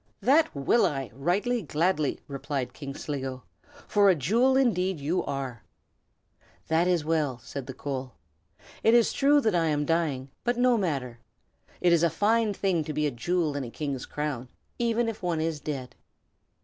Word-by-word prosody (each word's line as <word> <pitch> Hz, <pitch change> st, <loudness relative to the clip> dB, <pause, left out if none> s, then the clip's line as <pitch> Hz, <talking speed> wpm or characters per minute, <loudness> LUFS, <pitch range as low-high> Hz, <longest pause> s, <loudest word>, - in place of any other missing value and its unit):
"That 295 Hz, -, +4 dB
will 140 Hz, -, +3 dB
I, 135 Hz, -6 st, -4 dB
right 175 Hz, -, 0 dB, 0.2 s
gladly!" 155 Hz, -1 st, 0 dB
replied 140 Hz, -2 st, -4 dB
King 140 Hz, -2 st, -7 dB
Sligo, 135 Hz, -3 st, -5 dB, 0.4 s
"for 205 Hz, -1 st, +4 dB
a 185 Hz, -, +5 dB
jewel 230 Hz, -, +3 dB
indeed 190 Hz, -, +1 dB
you 155 Hz, +6 st, 0 dB
are." 135 Hz, -4 st, -4 dB, 1.1 s
"That 165 Hz, +2 st, +3 dB
is 175 Hz, -4 st, +1 dB
well!" 155 Hz, -5 st, 0 dB
said 135 Hz, 0 st, -7 dB
the 130 Hz, -, -7 dB
coal. 130 Hz, -3 st, -5 dB, 0.7 s
"It 225 Hz, +1 st, +5 dB
is 235 Hz, -2 st, +4 dB
true 285 Hz, +1 st, +4 dB
that 220 Hz, -5 st, +1 dB
I 170 Hz, -2 st, +2 dB
am 150 Hz, -1 st, 0 dB
dying; 145 Hz, -5 st, -1 dB
but 240 Hz, 0 st, 0 dB
no 250 Hz, 0 st, +4 dB
matter. 135 Hz, -, -2 dB, 0.6 s
It 175 Hz, -1 st, +4 dB
is 170 Hz, -, +4 dB
a 170 Hz, -, +4 dB
fine 215 Hz, +6 st, +2 dB
thing 185 Hz, -5 st, +1 dB
to 155 Hz, -, -4 dB
be 150 Hz, +1 st, 0 dB
a 145 Hz, -, +1 dB
jewel 155 Hz, +5 st, -1 dB
in 140 Hz, -, -2 dB
a 120 Hz, -, -6 dB
king's 140 Hz, 0 st, -4 dB
crown, 145 Hz, -4 st, -3 dB, 0.3 s
even 235 Hz, 0 st, +1 dB
if 225 Hz, -, -4 dB
one 175 Hz, -3 st, -1 dB
is 160 Hz, -1 st, -1 dB
dead. 135 Hz, -5 st, -5 dB
155 Hz, 175 wpm, -27 LUFS, 140-195 Hz, 1.1 s, a